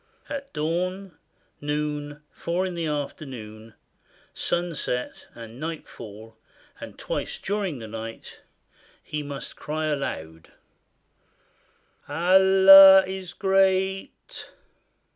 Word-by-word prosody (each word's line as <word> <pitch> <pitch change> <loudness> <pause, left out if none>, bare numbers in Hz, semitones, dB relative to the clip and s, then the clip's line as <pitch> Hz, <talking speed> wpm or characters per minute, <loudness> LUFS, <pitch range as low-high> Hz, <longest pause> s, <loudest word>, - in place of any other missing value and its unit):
At 275 -1 -6
dawn, 180 +4 -3 0.5
noon, 150 0 -4
four 175 +3 -2
in 185 - -4
the 170 -2 -3
afternoon, 120 -7 -6 0.6
sunset, 165 -8 -3
and 115 +1 -11
night 160 +1 -5
fall, 110 +1 -12 0.4
and - - -10
twice - - -4
during 195 -6 -3
the 115 -2 -8
night, 115 +1 -9 0.6
he 150 - -4
must 140 -1 -7
cry 155 +1 -4
aloud, 80 - -5 1.6
"Allah 190 +2 +8
is 190 -2 -7
great! 190 0 +1
155 Hz, 90 wpm, -25 LUFS, 135-190 Hz, 1.6 s, Allah